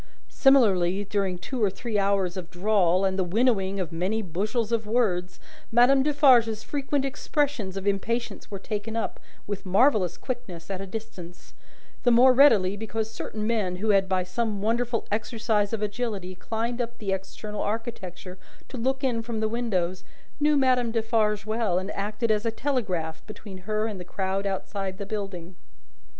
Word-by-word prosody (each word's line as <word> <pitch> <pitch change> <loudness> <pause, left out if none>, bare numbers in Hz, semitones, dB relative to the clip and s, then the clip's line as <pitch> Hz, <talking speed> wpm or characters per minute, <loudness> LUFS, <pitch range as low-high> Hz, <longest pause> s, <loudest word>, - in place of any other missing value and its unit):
Similarly, 200 -9 +4
during 195 -2 -1
two 240 +6 -3
or 205 - +4
three 215 +2 -2
hours 195 -2 +1
of 180 -2 -6
drawl, 185 -1 +2
and 190 0 0
the - - +3
winnowing 200 0 +1
of 180 -4 -3
many 190 +7 -1
bushels 210 +6 -2
of 225 -2 0
words, 185 -6 0 0.3
Madame 245 +4 +6
Defarge's 260 -7 +4
frequent 280 -1 -1
expressions 270 - -1
of 195 - -5
impatience 230 +4 -1
were 200 - -5
taken 210 +2 -4
up, 230 - -2 0.3
with 205 -1 -4
marvellous 195 - +3
quickness, 190 -9 -6
at 190 -1 -3
a 195 - -6
distance: 185 -4 -9 0.5
the 245 - +3
more 250 +2 +7
readily, 220 -8 +5
because 220 +1 -3
certain 215 -1 -5
men 215 -5 0
who 210 +4 -2
had 195 -1 +3
by 185 -1 +1
some 210 +3 -2
wonderful 230 +2 0
exercise 215 -1 0
of 220 -2 -2
agility 205 -3 -3
climbed 230 +5 -3
up 235 0 -5
the 200 -3 -3
external 205 +2 -5
architecture 200 -5 -5 0.3
to 260 - -7
look 265 +3 -1
in 240 -4 +1
from 230 -1 -4
the 220 - +1
windows, 195 -6 -1 0.4
knew 295 0 +4
Madame 255 -3 +3
Defarge 220 -2 +1
well, 215 -4 0
and 190 +2 -2
acted 210 +3 -1
as 210 0 +1
a 230 - +1
telegraph 205 - -2
between 210 -3 -9
her 215 0 +1
and 210 -4 -4
the - - -6
crowd 190 +2 -2
outside 195 0 -3
the 200 - -5
building. 195 -4 -5
210 Hz, 165 wpm, -26 LUFS, 190-235 Hz, 0.5 s, more